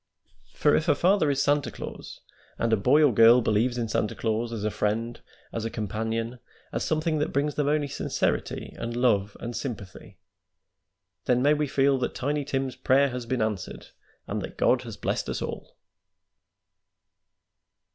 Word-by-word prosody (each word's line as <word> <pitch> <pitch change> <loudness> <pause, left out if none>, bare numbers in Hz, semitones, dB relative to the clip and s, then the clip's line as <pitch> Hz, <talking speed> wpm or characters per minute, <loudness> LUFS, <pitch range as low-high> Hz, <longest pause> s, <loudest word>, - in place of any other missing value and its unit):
"For 145 - +3
if 160 - 0
a 145 - +5
father 180 0 +3
is 140 -1 +1
Santa 145 0 +2
Claus, - - -9 0.4
and 115 -1 +1
a - - +7
boy 145 +9 +4
or 145 - +6
a - - -5
girl 115 +3 +7
believes 120 +2 +1
in 115 -2 -1
Santa 110 -1 -1
Claus 115 +1 -1
as 110 -3 -4
a 110 - 0
friend, 110 +3 -2 0.3
as 115 - -3
a 115 - -2
companion, 115 +3 -3 0.3
as - - -1
something 155 0 0
that 150 - -1
brings 145 +2 0
them 145 -1 -1
only 150 0 +1
sincerity - - -2
and 115 0 -4
love 105 -5 +1
and 120 0 -5
sympathy, 100 -8 -7 1.1
then 125 0 +2
may 145 +2 +5
we 150 0 0
feel 135 0 +2
that 125 - -2
Tiny 145 +2 -1
Tim's 135 -2 -2
prayer 135 +2 +3
has 125 -2 -6
been 125 -2 0
answered, 105 -4 -4 0.4
and - - -3
that - - -8
God - - +3
has - - -8
blessed - - -2
us - - -2
all." - - -6
125 Hz, 175 wpm, -26 LUFS, 115-145 Hz, 1.1 s, a